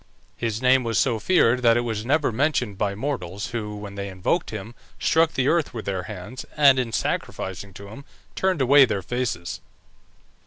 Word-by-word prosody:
His 115 0 -3
name 130 0 +5
was 115 -2 -1
so 120 -5 +2
feared 125 - +3
that 115 -1 +5
it - - +2
was 110 -3 -3
never 145 -1 +2
mentioned 125 -4 0
by 100 0 -1
mortals, 105 -5 -4
who, 105 -3 -4
when 105 -1 -8
they 100 0 -5
invoked 95 - -1
him, 110 +1 -7 0.3
struck 160 0 +3
the 130 0 0
earth 165 -6 +1
with 110 - -5
their 95 -2 -2
hands, 105 +5 -7
and 140 -3 +6
in 120 -3 -2
sacrificing 95 -2 -3
to 100 +1 -10
him 115 +7 -10 0.3
turned 190 -5 0
away 140 +2 +7
their 100 -6 -3
faces. 105 -9 -3
115 Hz, 185 wpm, -24 LUFS, 100-130 Hz, 0.3 s, away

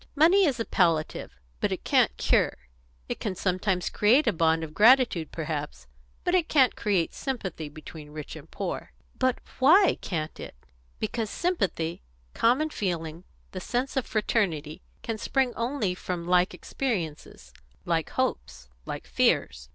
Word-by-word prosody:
"Money 350 +6 +5
is 265 -5 -1
a 230 - -1
palliative, 165 -4 0 0.3
but - - 0
it - - -3
can't - - +3
cure. - - +2 0.5
It - - -4
can 200 -4 -3
sometimes 185 0 0
create 240 +9 +4
a 230 - +2
bond 160 -1 +2
of 155 -1 -7
gratitude 225 - +4
perhaps, 150 - -5 0.4
but 355 - 0
it 360 -3 +2
can't 265 -5 +4
create 195 -6 0
sympathy 190 - -4
between 155 0 -11
rich 150 -1 -8
and - - -12
poor." - - -5 0.3
"But 255 -1 +2 0.2
why 340 +10 +5
can't 160 -4 -4
it?" - - -8 0.4
"Because 220 - -2
sympathy 195 - -1 0.3
common 270 +7 +2
feeling 170 - -3 0.3
the 185 - -5
sense 250 +7 -2
of 265 - -1
fraternity 175 -9 -1 0.2
can 225 -2 -3
spring 265 0 0
only 235 -5 -1
from 180 -1 -5
like 180 +1 +2
experiences, 180 - -4 0.3
like - - 0
hopes, 65 +1 -3 0.2
like - - -5
fears. 60 0 +1
190 Hz, 145 wpm, -27 LUFS, 160-255 Hz, 0.5 s, Money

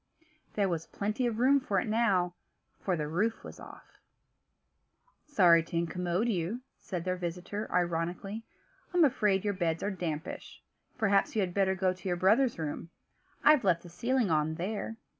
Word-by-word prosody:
There 200 -2 +2
was 165 -3 -3
plenty 215 +5 -1
of 225 -2 -2
room 265 +4 +4
for 205 -7 0
it - - -2
now, 200 -6 +2 0.5
for 185 - 0
the 150 -1 -2
roof 205 +9 -1
was - - -10
off. - - -14 1.3
"Sorry 180 - +5
to 165 +1 -5
incommode 175 +5 -1
you," 200 +3 -1 0.2
said 180 -4 -5
their 185 0 -1
visitor, 180 +4 -5
ironically. 175 +5 -1 0.5
"I'm 345 -3 +6
afraid 210 -7 +1
your 205 - +1
beds 165 -3 -1
are 205 - 0
dampish; 165 -4 -5 0.3
perhaps 200 -3 +2
you 215 - +2
had 180 -2 -2
better 190 -1 +2
go 185 -1 +1
to 185 +1 -9
your 175 - 0
brother's 225 +8 +3
room: 160 +1 -4 0.5
I've 300 -4 +6
left 175 -4 +2
the 175 - -11
ceiling 235 +3 0
on, 155 0 +1
there." 210 +5 -4
190 Hz, 165 wpm, -30 LUFS, 175-220 Hz, 1.3 s, I'm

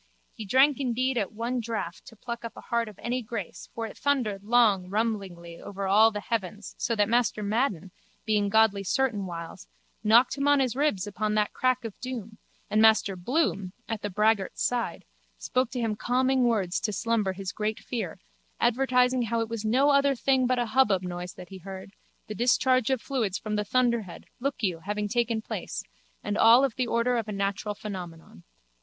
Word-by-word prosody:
He 220 - -8
drank 265 +7 +4
indeed 255 0 0
at 200 - -2
one 235 +3 -2
draught 220 -7 -5
to 225 - -12
pluck 235 +2 -6
up 230 - -7
a - - -8
heart 235 -1 -1
of 205 - -14
any 245 +2 -2
grace 220 -4 -6
for 230 - -3
it 220 - -8
thundered 240 -9 0
long 210 -5 +3
rumblingly 195 -6 -3
over 200 -1 -5
all 210 +4 +6
the 210 -2 -5
heavens 205 -1 -4
so 230 - 0
that 205 -1 +2
Master 235 -2 +1
Madden, 200 - -1 0.3
being 210 -2 +1
godly 215 -2 +3
certain 220 -2 0
whiles, 165 - -8 0.4
knocked 235 +6 +4
him 280 - +1
on 285 0 +5
his 255 -3 0
ribs 275 -10 +1
upon 210 +1 -2
that 210 -1 +1
crack 255 -1 0
of 225 - -5
doom 225 -4 -6 0.3
and 215 - +2
Master 220 -3 +4
Bloom, 195 - -1
at 225 -2 -3
the 205 - -3
braggart's 210 0 +1
side, 245 -1 -2 0.3
spoke 255 -1 0
to 250 +1 -4
him 225 -3 -1
calming 255 +3 +1
words 200 -7 +1
to 215 - -2
slumber 215 -2 0
his 190 0 -5
great 215 0 -2
fear, 240 -3 -5 0.4
advertising 250 +1 +2
how 230 0 -1
it 225 - -3
was 230 -2 -4
no 260 +7 +3
other 280 0 +3
thing 260 0 +2
but 255 0 +1
a 245 - +1
hubbub 210 -8 +3
noise 180 0 -6
that 180 - -11
he 190 -1 -9
heard, 190 +1 -9 0.3
the 215 - -6
discharge 255 +1 +2
of 265 -2 +1
fluid 230 -9 -1
from 215 +1 -3
the 210 - 0
thunderhead, 235 -4 0
look 270 -1 -3
you, 180 -5 0
having 205 +4 -3
taken 230 0 0
place, - - -5 0.4
and 205 +1 -2
all 235 +4 +7
of 265 - -2
the 255 -2 -1
order 235 +2 +1
of 225 -2 -2
a - - -4
natural 200 +1 -2
phenomenon. 175 - -8
220 Hz, 195 wpm, -27 LUFS, 200-245 Hz, 0.4 s, all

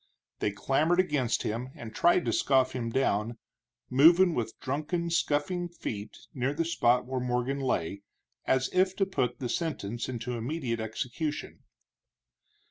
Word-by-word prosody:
They - - +1
clamored 145 - +1
against 145 -10 +1
him 120 +4 -3
and 110 -1 -9
tried 175 0 +3
to 115 - 0
scoff 130 +1 +3
him 120 -2 -3
down, 115 -2 0 0.5
moving 170 +7 +6
with 115 -5 -3
drunken, 155 +5 -2
scuffing 170 +2 0
feet 110 -10 -6 0.2
near 135 +2 -1
the 165 +2 0
spot 125 -6 +2
where 130 0 -2
Morgan 125 +2 -1
lay, 100 -8 -1 0.4
as 130 0 +2
if 185 0 +3
to 195 - +2
put 130 -10 -1
the 125 - -3
sentence 120 - -3
into 125 -1 -4
immediate 120 0 -2
execution. 125 +7 -4
130 Hz, 140 wpm, -29 LUFS, 120-160 Hz, 0.5 s, moving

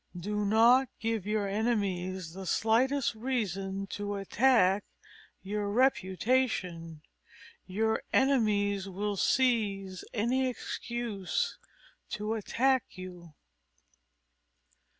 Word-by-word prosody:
Do 210 +3 -2
not 235 +5 +5
give 225 -3 -2
your 210 -1 0
enemies 190 -5 -1
the 190 0 -7
slightest 240 +6 +2
reason 195 -5 -2
to 205 0 -3
attack 200 -1 +3 0.6
your 205 +1 -2
reputation. 190 - 0 0.7
_Your 220 +4 +1
enemies 205 -7 +2
will 205 +2 -2
seize 200 -6 +1
any 250 +4 +1
excuse 235 - -3 0.6
to 210 +1 -2
attack 250 +3 0
you. 175 -4 -10
210 Hz, 85 wpm, -30 LUFS, 195-235 Hz, 0.7 s, not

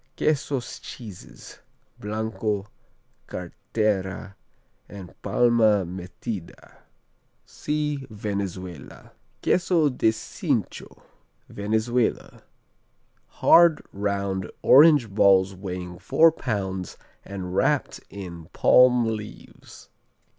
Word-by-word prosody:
Quesos 140 -4 -1
Cheeses: 105 -7 -11 0.4
Blanco, 105 -1 -3 0.6
Cartera 95 +2 -3 0.6
and 95 -3 -10
Palma 110 -2 +3
Metida 90 +2 -8 0.7
see 150 -2 -3
Venezuela. 100 -6 -6 0.3
Queso 175 -4 +2
de 125 -4 +2
Cincho 110 -1 -4 0.4
Venezuela 110 +3 -1 0.9
Hard, 170 -2 +4
round 100 -1 -2
orange 145 -3 +7
balls 95 -1 +4
weighing 90 -2 -7
four 160 - +4
pounds 95 - -4 0.3
and 95 -2 -7
wrapped - - +1
in 90 -5 -9
palm 125 -1 +5
leaves. 110 -2 -8
105 Hz, 75 wpm, -24 LUFS, 95-120 Hz, 0.9 s, orange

